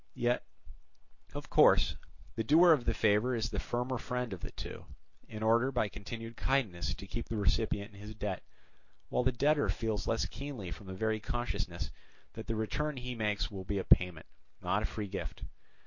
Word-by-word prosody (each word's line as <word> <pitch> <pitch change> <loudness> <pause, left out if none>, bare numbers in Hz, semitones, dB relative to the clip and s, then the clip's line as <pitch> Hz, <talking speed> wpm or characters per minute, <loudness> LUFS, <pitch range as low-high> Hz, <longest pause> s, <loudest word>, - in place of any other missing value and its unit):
Yet, 120 +1 +1 0.9
of - - -6
course, - - +6 0.4
the 110 - -1
doer 165 +8 +7
of 140 -7 +4
the 115 - +2
favour 110 +4 +3
is 115 -1 -1
the - - -1
firmer 125 +1 -2
friend 125 -1 -2
of 95 - -6
the - - -5
two, - - -8 0.4
in 110 0 -6
order 115 +4 +4
by 120 -5 +1
continued 115 +3 -7
kindness 90 - 0
to - - -9
keep 115 +4 -5
the 115 - -2
recipient 105 0 +1
in 100 - -13
his 105 +1 -8
debt; 105 -3 -3 0.7
while - - +2
the 130 +1 +3
debtor 145 +4 +3
feels 110 -3 -1
less 115 - +1
keenly 130 -11 -6
from 100 - -8
the 95 - -5
very 110 +2 0
consciousness 115 -7 -3 0.4
that 110 - -8
the 115 - -1
return 145 +7 -1
he 125 0 -4
makes 105 -3 -1
will 95 -2 -5
be 100 +2 -2
a 95 - 0
payment, 90 -3 +4 0.3
not - - +1
a - - 0
free 105 -2 -4
gift. - - -5
110 Hz, 190 wpm, -33 LUFS, 100-125 Hz, 0.9 s, doer